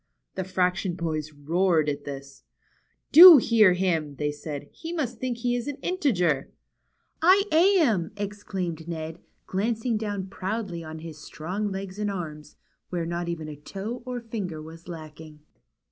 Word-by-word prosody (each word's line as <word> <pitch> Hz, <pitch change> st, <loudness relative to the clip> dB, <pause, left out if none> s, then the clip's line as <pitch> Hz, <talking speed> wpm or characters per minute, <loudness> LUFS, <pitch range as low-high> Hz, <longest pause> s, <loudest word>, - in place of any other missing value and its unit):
The 190 Hz, -, -3 dB
fraction 180 Hz, 0 st, 0 dB
boys 155 Hz, -3 st, -3 dB
roared 160 Hz, +2 st, +1 dB
at 145 Hz, -1 st, -3 dB
this. 140 Hz, -1 st, -8 dB, 0.7 s
Do 340 Hz, +1 st, +12 dB
hear 225 Hz, -6 st, +5 dB
him," 165 Hz, -6 st, -1 dB
they 150 Hz, +1 st, -1 dB
said. 145 Hz, -1 st, -7 dB
He 325 Hz, -, -8 dB
must 260 Hz, -9 st, -3 dB
think 255 Hz, -2 st, -2 dB
he 245 Hz, +1 st, 0 dB
is 245 Hz, +1 st, -3 dB
an 290 Hz, -, -3 dB
integer! 180 Hz, -, +1 dB, 0.4 s
" -, -, -47 dB, 0.2 s
I 375 Hz, +4 st, +6 dB
am! 315 Hz, -, +4 dB
" -, -, -28 dB
exclaimed 195 Hz, -5 st, -4 dB
Ned, 160 Hz, -1 st, -5 dB, 0.3 s
glancing 225 Hz, +4 st, -1 dB
down 205 Hz, -3 st, -3 dB
proudly 190 Hz, -2 st, -4 dB
on 160 Hz, 0 st, -8 dB
his 160 Hz, -1 st, -9 dB
strong 195 Hz, +6 st, -4 dB
legs 195 Hz, +1 st, -6 dB
and 210 Hz, -1 st, -1 dB
arms, 155 Hz, -6 st, -6 dB, 0.3 s
where 175 Hz, -2 st, -2 dB
not 170 Hz, +1 st, -3 dB
even 160 Hz, -2 st, -4 dB
a 150 Hz, -, -7 dB
toe 195 Hz, -, -6 dB
or 250 Hz, -1 st, -3 dB
finger 210 Hz, -9 st, -5 dB
was 165 Hz, +2 st, -11 dB
lacking. 155 Hz, -2 st, -10 dB
180 Hz, 160 wpm, -26 LUFS, 160-220 Hz, 0.7 s, Do